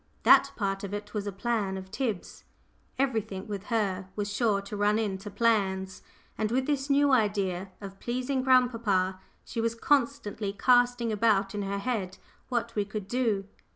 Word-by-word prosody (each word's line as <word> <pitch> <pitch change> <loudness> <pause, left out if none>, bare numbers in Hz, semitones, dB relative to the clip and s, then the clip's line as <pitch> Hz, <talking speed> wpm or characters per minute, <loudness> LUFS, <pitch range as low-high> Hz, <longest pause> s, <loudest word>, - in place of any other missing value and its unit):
That - - +6
part 195 -2 -2
of 200 +1 -4
it 205 0 -7
was 205 -2 -3
a - - -2
"plan" 200 -1 -1
of 190 0 -9
Tib's 215 -5 -3 0.5
everything 220 -7 -1
with 205 -1 -5
her 195 -5 -1
was 205 -1 -3
sure 210 -2 +2
to 200 +1 -7
run 205 +1 +2
into 205 -2 -2
"plans," 195 -3 0 0.4
and 215 - +1
with 260 +3 +1
this 285 -1 -1
new 285 0 +4
idea 200 -6 +1
of 195 -1 -9
pleasing 255 +2 -1
grandpapa, 230 -8 +2 0.3
she 230 - -3
was 230 0 0
constantly 230 -6 0
casting 245 -1 +3
about 210 -2 +2
in 205 - -2
her 200 0 -2
head 200 -4 -2 0.3
what 235 -2 -1
we 210 - +1
could 210 -1 -6
do. 220 -4 0
210 Hz, 165 wpm, -28 LUFS, 195-240 Hz, 0.5 s, That